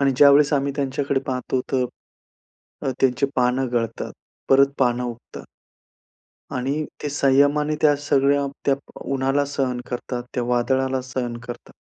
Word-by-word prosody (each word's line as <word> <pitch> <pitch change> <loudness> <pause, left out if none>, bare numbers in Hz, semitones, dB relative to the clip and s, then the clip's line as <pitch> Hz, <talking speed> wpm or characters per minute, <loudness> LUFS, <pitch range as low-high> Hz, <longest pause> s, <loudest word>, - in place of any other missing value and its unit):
आणि 140 -1 +3
ज्यावेळेस 145 +1 +6
आम्ही 140 -1 +1
त्यांच्याकडे 140 0 -1
पाहतो 130 0 -1
तर 130 -1 +2 1.0
अ, - - +1
त्यांची 135 +1 +2
पानं 125 +1 +2
गळतात, 115 -2 -2 0.4
परत 135 +1 +5
पान 125 -2 +2
उगतात 120 -1 -7 1.1
आणि 140 +5 -1 0.2
ते 145 - -1
संयमाने 145 +2 +3
त्या 150 -1 +5
सगळ्या, 140 0 +2 0.2
त्या 140 - +3
प 140 - -16
उन्हाला 135 +2 +1
सहन 125 -3 -1
करतात, 125 0 -4
त्या 125 - -1
वादळाला 130 +2 +1
सहन 125 -2 -4
करतात. 120 0 -9
135 Hz, 135 wpm, -22 LUFS, 125-140 Hz, 1.1 s, ज्यावेळेस